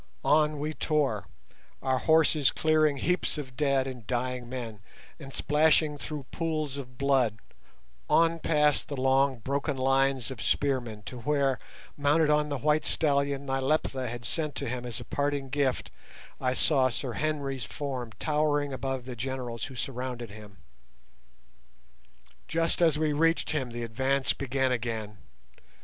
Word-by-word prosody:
On 150 0 +4
we 155 +2 -2
tore, 150 0 0 0.6
our 130 -1 +1
horses 160 -3 +4
clearing 155 -2 +2
heaps 180 +3 0
of 130 -4 -6
dead 140 -1 +2
and 125 -5 -7
dying 125 0 -2
men, 120 -4 -5 0.4
and 135 -3 -9
splashing 150 +1 +3
through 145 -1 -6
pools 155 -4 -2
of 130 -3 -8
blood, 135 -6 +2 0.7
on 165 0 +4
past 150 -2 +2
the 140 - -5
long 135 0 +3
broken 140 +4 -2
lines 135 -1 +2
of 120 -4 -7
spearmen 120 -7 0
to 125 +4 -7
where, 135 0 +1 0.4
mounted 150 +2 +3
on 150 0 +2
the 145 - -1
white 150 +4 +2
stallion 140 -2 +1
Nyleptha 135 -1 0
had 120 0 -6
sent 150 +5 -1
to 140 - -3
him 125 0 -3
as 115 -3 -4
a 120 - -8
parting 140 +1 -1
gift, 140 -2 0 0.5
I 130 0 0
saw 130 -3 +3
Sir 125 0 -4
Henry's 140 -5 -2
form 125 0 -4
towering 150 -2 +1
above 130 -1 -3
the 125 -1 -6
generals 125 -1 -4
who 135 - -9
surrounded 125 -3 -4
him. 105 -1 -12 1.9
Just 165 +1 0
as 160 -3 +5
we 155 -1 +1
reached 165 +3 +2
him 140 -5 -1
the 120 0 -5
advance 130 +4 +1
began 135 -1 0
again. 110 -4 -3
135 Hz, 145 wpm, -29 LUFS, 125-150 Hz, 1.9 s, as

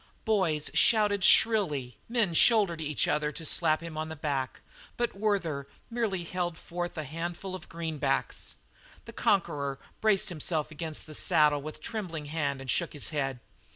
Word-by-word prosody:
Boys 180 -9 +1
shouted 210 -3 +4
shrilly; 155 - +4
men 230 -7 +2
shouldered 195 -3 +5
each 150 -1 0
other 150 0 +1
to 160 - -7
slap 155 0 +2
him 165 -2 -6
on 155 0 -3
the 160 - -5
back; 140 -4 -2 0.4
but 240 0 0
Werther 190 -9 -1 0.2
merely 220 -7 -1
held 175 -1 -3
forth 175 +1 -5
the 155 - -3
handful 170 +5 -5
of 185 - -8
greenbacks. 155 -5 -2 0.5
The - - -10
conqueror 140 -8 +1 0.2
braced 215 -1 +2
himself 155 -2 -2
against 155 0 -4
the 155 - -10
saddle 150 -3 +3
with 155 +2 -7
a - - -17
trembling 180 -9 -4
hand 145 -2 -2
and 135 - -2
shook - - 0
his 145 - -3
head. 135 -5 -2
165 Hz, 160 wpm, -29 LUFS, 150-190 Hz, 0.5 s, shouldered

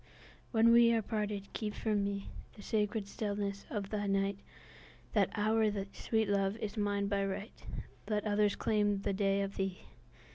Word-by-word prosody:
When 230 0 +5
we 235 0 +7
are 225 -1 +2
parted, 210 -2 -3
keep 210 -2 -3
for 220 - -1
meThe 200 -1 0 0.4
sacred 210 -1 0
stillness 200 -1 -3
of 200 -3 -3
the 205 -1 -1
night; 195 0 +1 0.7
That - - +3
hour, 220 +1 +2 0.3
sweet 220 -2 0
Love, 200 +1 +1
is 210 -2 -4
mine 205 -1 0
by 200 0 +1
right; 195 +3 -5 0.4
Let 210 -1 0
others 205 -1 +2
claim 205 -2 +1
the 200 - 0
day 195 0 +2
of 195 0 -5
thee! 190 -1 -2
205 Hz, 155 wpm, -33 LUFS, 200-215 Hz, 0.7 s, we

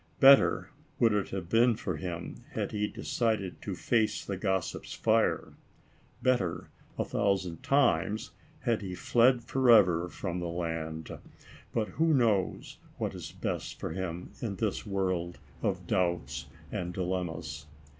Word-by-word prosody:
Better 135 +2 +6 0.3
would 115 -3 +4
it 105 -2 0
have 95 -3 -4
been 115 +4 +4
for 95 -7 -3
him, 85 +1 -6
had - - -2
he 105 0 0
de - - -9
cided 110 -6 -1
to - - -4
face 110 -3 +1
the 100 - -3
gossips' 95 -2 -2
fire. - - +2 0.7
Better 120 -10 +1 0.3
a - - 0
thousand 95 -4 0
times, 110 - +2 0.3
had 115 -4 +1
he 95 -2 -5
fled 120 +4 +3
forever 110 -10 +5
from 85 +1 -4
the 90 - -3
land. 80 -2 -4 0.6
But 110 -2 -1
who 165 +2 +1
ever 155 - +5
knows 105 -7 0 0.2
what - - -2
is - - -7
best - - -4
for - - -4
him, 90 0 -4
in 110 -5 -2
this 105 +2 -2
world 95 -3 -1 0.2
of - - -1
doubts 70 -7 -1 0.2
and 90 0 -3
dilemmas 85 -5 -3
95 Hz, 145 wpm, -30 LUFS, 85-115 Hz, 0.7 s, Better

